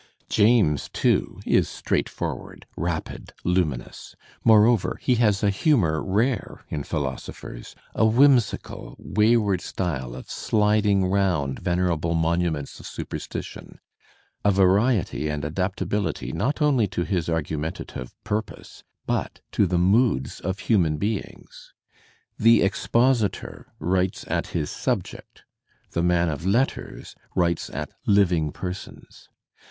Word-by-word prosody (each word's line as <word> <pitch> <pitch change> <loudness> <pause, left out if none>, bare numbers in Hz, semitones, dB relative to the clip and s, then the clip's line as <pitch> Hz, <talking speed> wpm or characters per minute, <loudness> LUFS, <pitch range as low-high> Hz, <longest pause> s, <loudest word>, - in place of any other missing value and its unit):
James» 105 - +3
too> - - +1
is - - +3
straightforward, - - -3
rapid, 85 -2 -4
luminous; 85 -8 -2 0.3
moreover, 110 -1 +4
he 125 - +2
has 105 -4 +2
a 100 - +4
humour 95 - +2
rare 110 +4 -1
in 75 - -3
philosophers, 65 -5 -5 0.2
a - - +1
whimsical, 120 +2 +2
wayward 105 -2 +2
r - - -12
style 65 -9 -3
of 65 - -9
sliding 105 -2 +2
round 90 -8 0
venerable 85 -2 0
monuments 80 -3 -1
of - - -9
superstition, - - -7 0.7
a 105 - +4
variety 95 - +2
and 75 -1 -3
adaptability 95 +5 -2
not 145 +8 -1
only 130 -8 +3
to 90 -2 -2
his 90 -3 -1
argumentative 80 -5 -4
purpose, 105 0 -5 0.2
but - - -2
to 100 - +2
the 90 0 0
moods 95 - +2
of 95 +1 -3
human 85 -9 +2
beings. 105 +5 -5 0.7
The 115 +1 +6
expositor 115 +2 0
writes 90 +3 -1
at - - -1
his 75 -4 -3
subject; - - -4 0.5
the 85 - -1
man 85 0 +2
of 75 0 -3
letters 115 +8 -1 0.2
writes 85 -2 +1
at - - -5 0.2
living 90 -7 +3
persons. 90 +3 -8
95 Hz, 115 wpm, -24 LUFS, 80-105 Hz, 0.7 s, The